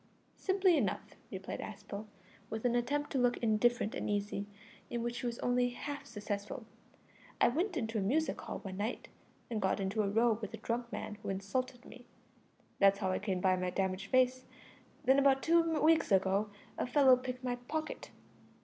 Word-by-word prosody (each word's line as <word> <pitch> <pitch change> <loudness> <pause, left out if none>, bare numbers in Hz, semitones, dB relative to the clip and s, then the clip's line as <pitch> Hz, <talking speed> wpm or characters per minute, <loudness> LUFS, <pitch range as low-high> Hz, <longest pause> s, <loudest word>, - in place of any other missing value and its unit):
"Simply 375 -3 +3
enough," 210 -9 -2 0.2
replied 190 0 -5
Aspel, 205 0 -7 0.4
with 220 +2 -4
an 245 - +3
attempt 285 +5 0
to 270 - +1
look 245 0 +3
indifferent 230 0 +2
and - - -3
easy, 205 0 -1 0.4
in 235 -1 -2
which 240 0 -2
he 245 - -2
was 235 0 -3
only 245 0 +2
half 285 +4 -6
successful 210 +4 -5 0.7
"I - - +6
went 345 - -1
into 225 -4 -1
a - - -1
music 290 +12 0
hall - - -5
one 190 -2 -6
night 215 +5 -3 0.4
and 220 -2 -1
got 190 0 +1
into 195 +3 0
a 200 - 0
row 225 +1 +3
with 215 +1 -5
a - - -10
drunk 235 +2 -3
man 210 -3 -5
who 205 - -5
insulted 245 +7 -3
me. 245 -1 -13 0.7
That's 200 0 +6
how 190 -2 0
I - - 0
came 190 -3 -2
by 185 0 +4
my 180 0 -1
damaged 190 +1 -1
face. 255 0 +3 0.6
Then 265 +1 +6
about 270 -1 +4
two 335 +1 +5 0.2
weeks 320 -6 +4
ago 195 +2 +3 0.3
a - - 0
fellow 265 0 +6
picked 255 0 -5
my 245 -1 -1
pocket. 305 +6 -4
235 Hz, 185 wpm, -33 LUFS, 200-255 Hz, 0.7 s, I